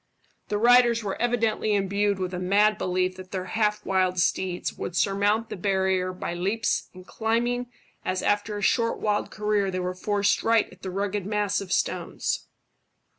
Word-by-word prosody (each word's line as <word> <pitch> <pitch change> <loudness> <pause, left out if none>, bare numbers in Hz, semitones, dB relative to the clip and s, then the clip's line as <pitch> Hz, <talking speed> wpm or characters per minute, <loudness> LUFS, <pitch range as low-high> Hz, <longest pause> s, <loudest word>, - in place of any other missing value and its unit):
The 210 - -1
riders 235 0 +5
were 200 +1 -4
evidently 225 -3 +1
imbued 200 +1 +1
with 185 -1 -3
a 180 - -3
mad 205 +4 +3
belief 185 0 0
that 185 0 -10
their 185 -1 -4
half 210 +2 0
wild 185 -1 +1
steeds 185 0 0
would 175 - -6
surmount 205 +7 +1
the - - -4
barrier 190 -1 0
by 180 -1 -5
leaps 195 +6 -1
and 185 0 -12
climbing, 240 +4 -1 0.3
as 185 0 -2
after 205 0 0
a 205 - -5
short 230 +3 +2
wild 210 -1 0
career 210 -2 0
they 185 -1 -2
were 180 0 -2
forced 205 +2 +1
right 225 -1 +3
at - - -17
the 190 - -5
rugged 200 +1 -2
mass 205 -1 0
of 190 -2 -8
stones. - - -1
200 Hz, 175 wpm, -26 LUFS, 185-215 Hz, 0.3 s, riders